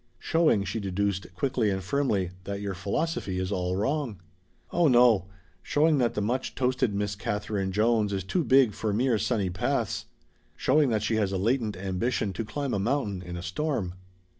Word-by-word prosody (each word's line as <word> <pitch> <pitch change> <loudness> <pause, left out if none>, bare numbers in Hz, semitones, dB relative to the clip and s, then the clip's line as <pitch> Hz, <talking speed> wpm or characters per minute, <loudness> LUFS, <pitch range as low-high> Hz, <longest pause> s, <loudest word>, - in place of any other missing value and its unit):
"Showing," 160 -11 +2
she 110 - -3
deduced 100 -1 -2
quickly 125 0 +1
and 95 -1 -2
firmly, 100 -5 0
"that 100 0 -4
your 100 -1 -3
philosophy 100 - -2
is 95 +1 -2
all 90 -1 -1
wrong." 120 0 -1 0.5
"Oh 175 -1 +3
no; 120 -7 +5 0.3
showing 150 0 +2
that 120 -2 +1
the 105 - 0
much 125 +5 -2
toasted 125 -4 +1
Miss 100 0 -1
Katherine 105 -1 -2
Jones 110 +1 +2
is 95 -2 -2
too 170 - 0
big 130 -6 +5
for 105 0 -2
mere 120 0 +2
sunny 100 -4 0
paths. 90 - -1 0.5
Showing 145 +1 +3
that 110 -2 0
she 110 - +1
has 100 -3 +1
a 95 - -1
latent 110 0 0
ambition 95 +2 -1
to 115 - -3
climb 140 +4 -3
a 100 - 0
mountain 105 -4 -1
in 90 -1 -7
a 85 - -6
storm." 95 - -2
105 Hz, 180 wpm, -27 LUFS, 95-130 Hz, 0.5 s, no